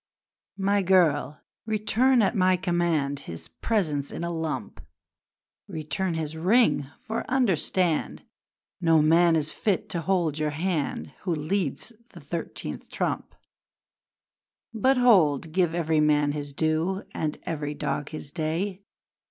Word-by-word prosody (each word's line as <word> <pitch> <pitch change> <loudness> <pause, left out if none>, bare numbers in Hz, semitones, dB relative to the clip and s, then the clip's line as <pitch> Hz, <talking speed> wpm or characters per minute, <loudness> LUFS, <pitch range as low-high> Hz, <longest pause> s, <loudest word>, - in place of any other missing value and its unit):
'My 200 +1 +2
girl! 170 -6 +2 0.3
Return 220 +3 +3
at 195 - +1
my 185 -1 +3
command 170 -6 0
His 80 -1 -7
presents 155 -11 -1
in - - -6
a 170 - -2
lump! 160 -1 -4 0.9
Return 170 +1 -3
his 160 -1 -3
ring! 160 - +3
For 220 +1 -4
understand 185 - +1 0.6
No 165 -2 +4
man 165 +2 +5
is 155 -1 0
fit 200 -4 -1
to 175 -5 -2
hold 170 -4 0
your 155 0 0
hand 165 -4 -2
Who 180 -3 -1
leads 160 - -2 0.2
a - - -9
thirteenth 165 +3 -6
trump! - - -3 1.4
'But 260 +4 +2
hold! 165 - +4
Give 175 -1 +1
every 160 -2 +1
man 150 -1 +3
his 145 -1 -5
due 160 +6 0
And 155 -1 -2
every 150 -2 -3
dog 145 0 -3
his 155 -2 -6
day. 175 +5 -2
165 Hz, 125 wpm, -26 LUFS, 150-190 Hz, 1.4 s, man